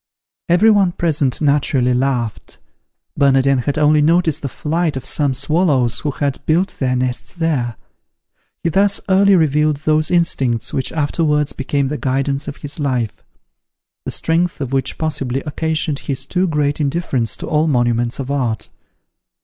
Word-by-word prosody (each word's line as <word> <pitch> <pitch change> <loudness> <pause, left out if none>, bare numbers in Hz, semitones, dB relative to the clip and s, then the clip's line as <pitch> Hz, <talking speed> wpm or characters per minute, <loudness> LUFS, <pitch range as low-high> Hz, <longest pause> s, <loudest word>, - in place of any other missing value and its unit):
Every 200 +6 +5
one 195 -4 +3
present 150 -7 0
naturally 140 -4 +2
laughed. 125 -3 -2 0.6
Bernardin 135 -1 +3
had 140 +4 -2
only 150 0 +4
noticed 165 0 +2
the 140 - -3
flight 155 +1 -2
of 130 - -7
some 145 -3 0
swallows 145 -7 +1
who 150 - -2
had 140 0 -3
built 175 +5 +1
their 130 -2 0
nests 125 +4 -3
there. 145 -9 -1 0.9
He 170 - +1
thus 200 +4 +2
early 195 +1 +5
revealed 150 -2 +2
those 155 0 +2
instincts 135 -9 +1
which 130 - -1
afterwards 150 -1 0
became 140 0 -1
the 150 - -4
guidance 135 +2 -1
of 145 - -6
his 145 +3 -4
life: 125 -6 -2 0.8
the - - -5
strength 165 +1 0
of 135 -2 -4
which 135 0 -1
possibly 135 -5 -2
occasioned 155 0 -2
his 135 -1 -2
too 185 +5 0
great 150 -2 0
indifference 140 -6 -1
to - - -6
all 155 +1 +1
monuments 120 -3 +1
of 135 0 -4
art. 120 -6 -2
145 Hz, 150 wpm, -18 LUFS, 130-160 Hz, 0.9 s, Every